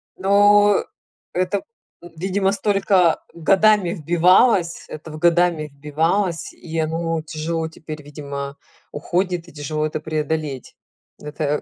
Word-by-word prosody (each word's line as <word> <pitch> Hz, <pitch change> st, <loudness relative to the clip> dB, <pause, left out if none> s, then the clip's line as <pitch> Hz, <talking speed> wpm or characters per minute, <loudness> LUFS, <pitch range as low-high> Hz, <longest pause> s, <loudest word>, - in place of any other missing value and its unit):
Ну, 205 Hz, +1 st, +4 dB, 0.5 s
это, 185 Hz, +2 st, -1 dB, 0.4 s
видимо, 185 Hz, +3 st, -1 dB
столько 195 Hz, -4 st, +2 dB
годами 195 Hz, +2 st, +3 dB
вбивалось, 175 Hz, -, +3 dB
это 155 Hz, +1 st, -9 dB
в 155 Hz, -, -8 dB
годами 170 Hz, -2 st, +2 dB
вбивалось, 160 Hz, +6 st, -1 dB
и 165 Hz, -1 st, -8 dB
оно 165 Hz, +1 st, -1 dB
тяжело 160 Hz, +1 st, -3 dB
теперь, 155 Hz, -1 st, -9 dB
видимо, 140 Hz, -1 st, -7 dB, 0.3 s
уходит 175 Hz, +2 st, -2 dB
и 170 Hz, -, -15 dB
тяжело 155 Hz, +1 st, -3 dB
это 155 Hz, 0 st, -3 dB
преодолеть. 155 Hz, -3 st, -3 dB, 0.4 s
Это 150 Hz, 0 st, -2 dB
165 Hz, 110 wpm, -21 LUFS, 155-185 Hz, 0.5 s, Ну